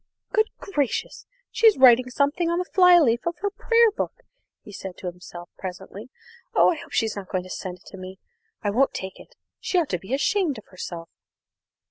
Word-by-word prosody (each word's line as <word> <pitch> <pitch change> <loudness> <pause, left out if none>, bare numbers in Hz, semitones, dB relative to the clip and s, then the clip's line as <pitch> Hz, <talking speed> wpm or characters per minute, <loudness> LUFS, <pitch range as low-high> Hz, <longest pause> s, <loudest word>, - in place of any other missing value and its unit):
"Good 435 0 +2
gracious! 290 - -3 0.2
she's 450 -2 +5
writing 255 -1 +6
something 290 +7 0
on 340 - 0
the 360 - -1
flyleaf 345 -10 +4
of 340 -2 -2
her 405 - 0
prayer 460 +2 +3
book," - - -5 0.4
he - - -12
said 190 -2 -8
to - - -11
himself 175 -1 -8
presently. 190 +5 -8 0.5
"I - - +5
hope - - -14
she's 225 -2 0
not 195 -2 -7
going 185 -1 -2
to 185 - -11
send 180 -2 -6
it 185 - -27
to 195 - -11
me. 185 0 -9 0.5
I 205 - 0
won't 265 +6 +2
take 190 0 -6
it. - - -16 0.2
She 370 - -1
ought 335 -5 +1
to 180 - -1
be 195 +9 -3
ashamed 325 0 0
of 215 - -11
herself!" 170 -2 -7
245 Hz, 190 wpm, -24 LUFS, -, 0.5 s, writing